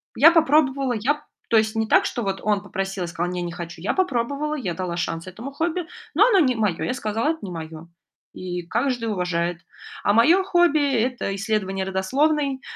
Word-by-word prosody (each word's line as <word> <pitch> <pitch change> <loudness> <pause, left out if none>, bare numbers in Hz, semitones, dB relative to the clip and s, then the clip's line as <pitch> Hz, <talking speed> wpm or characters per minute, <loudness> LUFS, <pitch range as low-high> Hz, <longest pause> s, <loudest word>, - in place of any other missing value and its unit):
Я 305 +8 +8
попробовала. 280 -5 +3
Я 290 +7 -1 0.3
то 225 - +4
есть 220 +1 +1
не 220 0 0
так, - - +4
что 240 - -2
вот 195 -2 -2
он 210 -2 +1
попросил, 195 -2 -4
я - - -3
сказала: 175 +1 -3
"Не, 180 - -3
не 175 -1 -4
хочу". 170 -1 -8
Я 190 - -1
попробовала, 290 -3 -1
я 200 - -3
дала 180 -2 -3
шанс 165 -1 -3
этому 220 +9 -8
хобби, 335 +3 -2 0.3
но 400 +9 +5
оно 440 -6 +4
не 255 -7 +3
мое. 210 -6 0
Я - - -1
сказала: 225 +2 -1
"Это 320 0 -1
не 195 - -6
мое". 160 0 -8 0.5
И 180 -1 -5
каждый 245 +1 -1
уважает. 180 -4 -1 0.5
А 205 - +3
мое 320 - +5
хобби- 345 -6 +3
это 245 -5 -2
исследование 195 -2 -1
родословной. 270 +9 0
225 Hz, 195 wpm, -23 LUFS, 185-285 Hz, 0.5 s, Я